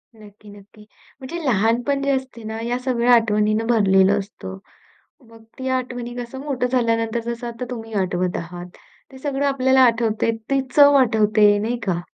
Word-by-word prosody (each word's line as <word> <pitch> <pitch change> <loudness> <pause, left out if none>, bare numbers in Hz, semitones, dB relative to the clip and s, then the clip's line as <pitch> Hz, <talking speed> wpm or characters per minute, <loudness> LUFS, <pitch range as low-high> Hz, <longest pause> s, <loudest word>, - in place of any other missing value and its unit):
नक्की-नक्की. 210 0 -16 0.3
म्हणजे 320 +6 -7
लहानपण 240 +4 +1
जे 280 - +1
असते 260 -3 -4
ना, 220 +1 -6
या 240 +2 -2
सगळ्या 250 -1 +2
आठवणीनं 215 -1 +2
भरलेलं 200 -3 +3
असतं. 195 -1 -8 0.7
मग 225 0 -17 0.2
ती 260 0 -4
आठवणी 245 -1 -6
कसं 245 +2 -7
मोठं 260 -4 -1
झाल्यानंतर 230 -2 0
जसं 235 +1 -4
आता 235 +1 -6
तुम्ही 225 -2 -7
आठवत 180 0 -2
आहात. 175 +1 -7 0.5
ते 265 - -12
सगळं 280 0 -2
आपल्याला 265 -1 +2
आठवतंय 230 -2 +1 0.2
ते 275 0 +2 0.2
चव 285 -1 +7
आठवते 215 -3 +3
नाही 225 +4 -2
का? 175 -2 0
230 Hz, 155 wpm, -21 LUFS, 210-255 Hz, 0.7 s, चव